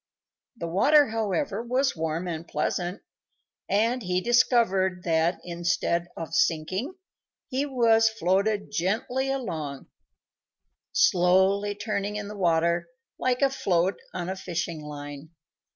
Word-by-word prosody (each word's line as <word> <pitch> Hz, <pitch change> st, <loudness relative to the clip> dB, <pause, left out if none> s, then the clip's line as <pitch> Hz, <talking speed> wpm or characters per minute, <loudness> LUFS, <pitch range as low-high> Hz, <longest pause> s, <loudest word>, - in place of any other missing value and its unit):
The 170 Hz, -, -4 dB
water, 285 Hz, -, +4 dB
however, 220 Hz, +1 st, -1 dB
was 255 Hz, +3 st, 0 dB
warm 160 Hz, +2 st, -2 dB
and 165 Hz, -1 st, -5 dB
pleasant, 175 Hz, +4 st, -2 dB, 0.7 s
and 230 Hz, +5 st, +2 dB
he 180 Hz, -2 st, 0 dB
discovered 195 Hz, -5 st, +2 dB
that, 165 Hz, +1 st, +1 dB
instead 170 Hz, 0 st, -1 dB
of 165 Hz, -1 st, -6 dB
sinking, 185 Hz, -, 0 dB, 0.5 s
he 270 Hz, +3 st, -1 dB
was 225 Hz, -4 st, +4 dB
floated 205 Hz, 0 st, 0 dB
gently 240 Hz, +9 st, -1 dB
along, 160 Hz, -, -4 dB, 1.0 s
slowly 190 Hz, +3 st, +3 dB
turning 205 Hz, -1 st, -3 dB
in 210 Hz, -1 st, -4 dB
the 210 Hz, -, -7 dB
water 170 Hz, -2 st, +1 dB, 0.3 s
like 255 Hz, +1 st, +1 dB
a 275 Hz, -, +4 dB
float 185 Hz, -7 st, 0 dB
on 175 Hz, -1 st, -4 dB
a 190 Hz, -, -3 dB
fishing 170 Hz, -3 st, -4 dB
line. 145 Hz, 0 st, -8 dB
190 Hz, 120 wpm, -26 LUFS, 170-225 Hz, 1.0 s, water